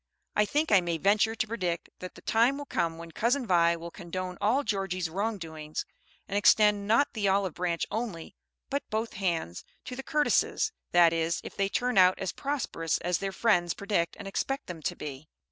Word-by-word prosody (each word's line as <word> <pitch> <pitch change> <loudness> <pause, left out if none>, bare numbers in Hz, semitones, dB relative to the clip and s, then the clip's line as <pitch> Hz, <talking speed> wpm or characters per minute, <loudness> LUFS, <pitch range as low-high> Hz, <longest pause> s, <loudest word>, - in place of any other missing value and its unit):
I 210 - +4
think 300 +6 0
I 200 -3 +7
may 170 -1 -1
venture 210 +5 +3
to 220 - -1
predict 180 -7 -3
that 185 - -8
the - - -14
time 235 +5 +3
will 290 - -6
come 165 -10 -1
when 165 0 -9
Cousin 245 - +1
Vi 170 -4 +4
will 170 +1 -8
condone 180 +1 -5
all 245 +8 +2
Georgie's 185 - -2
wrong 210 +4 -1
doings, 155 -3 -6 0.4
and 200 - -4
extend, 205 0 +4
not 235 +7 +4
the 210 -4 0
olive 190 -2 +2
branch 175 -2 -1
only, 215 -8 -4 0.4
but 280 +1 0
both 220 +1 -2
hands, 170 - -2 0.2
to 250 - -6
"the 265 - -5
Curtises," 300 +2 +1 0.2
that 170 -1 +6
is 165 +1 0
if - - -9
they 195 0 0
turn 245 -1 +1
out 185 0 +6
as 190 - -2
prosperous 265 - -2
as 180 0 -1
their 195 0 -2
friends 175 -5 +2
predict 200 -4 -1
and - - -8
expect 270 +8 -2
them 170 -3 -7
to - - -2
be. 145 0 -7
195 Hz, 195 wpm, -29 LUFS, 170-225 Hz, 0.4 s, I